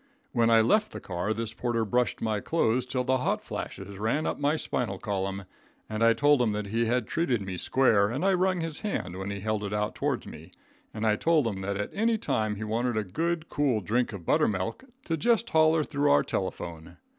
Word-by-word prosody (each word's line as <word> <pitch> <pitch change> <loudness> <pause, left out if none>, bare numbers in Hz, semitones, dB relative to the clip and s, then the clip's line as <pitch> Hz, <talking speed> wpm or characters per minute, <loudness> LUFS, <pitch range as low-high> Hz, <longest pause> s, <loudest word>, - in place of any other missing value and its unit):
When 115 -2 +3
I 115 -1 +6
left 215 - +2
the - - -5
car 90 +3 -3
this 110 0 -2
porter 115 -2 -1
brushed 120 -1 0
my 110 -2 0
clothes 125 -2 +1
till 125 0 -1
the 130 0 +1
hot - - 0
flashes 95 0 -7
ran 115 +9 0
up - - -2
my 145 +2 +2
spinal 120 -9 -2
column, 95 -1 -3 0.4
and 110 +1 -2
I 115 0 +6
told 145 +1 +4
him 110 -3 +2
that 105 0 -3
he 115 +3 0
had 120 0 +1
treated 145 -6 0
me 95 -1 -5
square, 110 -3 +3
and 130 - -2
I 195 - +4
rung 185 -1 +1
his 165 -2 -1
hand 200 - -3
when 95 +1 -5
he 100 -1 -4
held 110 0 -1
it 100 0 -4
out 105 +1 -1
toards - - -2
me, - - -11 0.4
and 110 0 -4
I 105 -1 +3
told 160 -1 +3
him 100 -4 -2
that 100 +1 -2
at 105 - -3
any 225 +2 +2
time 110 - -1
he 105 - -5
wanted 115 +2 -1
a 110 - +1
good, 160 - -2
cool 135 -6 +1
drink 115 +6 0
of 95 -5 -8
buttermilk, 100 - 0 0.2
to 165 - -1
just 235 +6 +2
holler 160 0 +4
through 145 -1 0
our 145 - +5
telephone. 85 -3 -5
115 Hz, 220 wpm, -28 LUFS, 105-145 Hz, 0.4 s, I